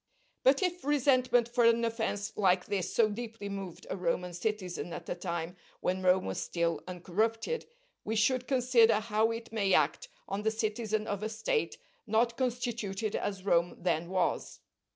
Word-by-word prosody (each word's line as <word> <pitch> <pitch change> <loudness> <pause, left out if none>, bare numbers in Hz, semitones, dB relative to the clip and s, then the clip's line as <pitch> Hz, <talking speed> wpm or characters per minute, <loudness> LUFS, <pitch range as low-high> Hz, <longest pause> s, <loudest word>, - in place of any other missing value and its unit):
But 270 +6 +4
if 360 -1 -1
resentment 255 -4 +3
for 240 0 +1
an 230 0 +4
offence 220 -3 -2
like 185 -3 +3
this 195 -3 -2
so 230 - +4
deeply 220 -1 -6
moved 195 -3 -6
a - - -3
Roman 180 0 -1
citizen 180 -3 -3
at 170 - -7
a - - -1
time 170 -1 -4 0.2
when 185 +1 -1
Rome 185 0 +3
was 95 - -3
still 165 - -1
uncorrupted, 220 - -1 0.4
we 220 - -2
should 250 +3 +2
consider 245 -4 +4
how 220 0 +1
it 230 0 -5
may 200 -4 +3
act - - +1 0.2
on 200 - -3
the 220 - +2
citizen 215 -1 -1
of 205 -1 -3
a 215 - -2
State 450 - -1 0.3
not 230 +2 +2
constituted 230 -5 -2
as 195 -2 -3
Rome 175 -2 +2
then 170 -1 -1
was. 185 -1 -1
215 Hz, 165 wpm, -31 LUFS, 185-235 Hz, 0.4 s, But